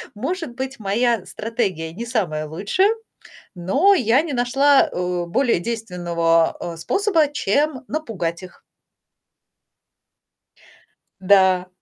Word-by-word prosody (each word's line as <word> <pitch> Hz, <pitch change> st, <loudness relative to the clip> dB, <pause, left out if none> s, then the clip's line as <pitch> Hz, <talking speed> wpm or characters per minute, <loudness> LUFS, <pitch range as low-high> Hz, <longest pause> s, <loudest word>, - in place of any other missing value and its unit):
может 270 Hz, -, -4 dB
быть, 265 Hz, 0 st, -5 dB
моя 220 Hz, +1 st, 0 dB
стратегия 195 Hz, -9 st, -3 dB
не 230 Hz, +7 st, -6 dB
самая 175 Hz, -11 st, -2 dB
лучшая, 205 Hz, -, +1 dB, 0.6 s
но 270 Hz, -, +3 dB
я 255 Hz, -, +3 dB
не 325 Hz, -4 st, -5 dB
нашла, 270 Hz, +3 st, +3 dB
э, 180 Hz, -1 st, -2 dB
более 235 Hz, +4 st, +1 dB
действенного, 175 Hz, -6 st, 0 dB
а, 170 Hz, -1 st, -6 dB
способа, 330 Hz, -, +1 dB
чем 290 Hz, +2 st, 0 dB
напугать 195 Hz, -, -4 dB
их. 185 Hz, -, -13 dB, 2.6 s
Да. 190 Hz, -1 st, +4 dB
220 Hz, 100 wpm, -21 LUFS, 180-275 Hz, 2.6 s, Да